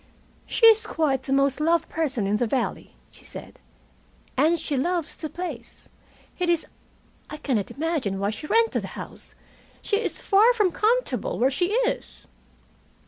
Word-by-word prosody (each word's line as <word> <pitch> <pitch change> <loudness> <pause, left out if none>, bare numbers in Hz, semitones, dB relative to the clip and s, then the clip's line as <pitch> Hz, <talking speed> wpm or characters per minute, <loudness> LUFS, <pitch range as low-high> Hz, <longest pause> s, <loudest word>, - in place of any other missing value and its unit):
"She 460 - +3
is 445 -1 +7
quite 280 -5 0
the 265 - -6
most 275 0 +2
loved 330 +1 +2
person 280 -9 -1
in 205 +2 +1
the 240 - 0
valley," 250 +1 -2 0.2
she - - -17
said. - - -10 0.8
"And 315 +5 +3
she 290 - -3
loves 340 +4 -1
the 310 - -5
place. 300 -11 -7 0.5
It 355 -1 0
is 340 -2 +2 0.6
I 300 - -6
cannot 245 -9 -1
imagine 295 - -2
why 200 +1 0
she 220 +8 -7
rented 455 +4 +2
the - - -6
house. - - -7 0.5
She 410 - +1
is 455 - -3
far 435 +5 +5
from 420 -6 +2
comfortable 470 +7 0
where 260 +3 +3
she 355 +6 +1 0.2
is." - - -4
310 Hz, 160 wpm, -25 LUFS, 265-360 Hz, 0.8 s, is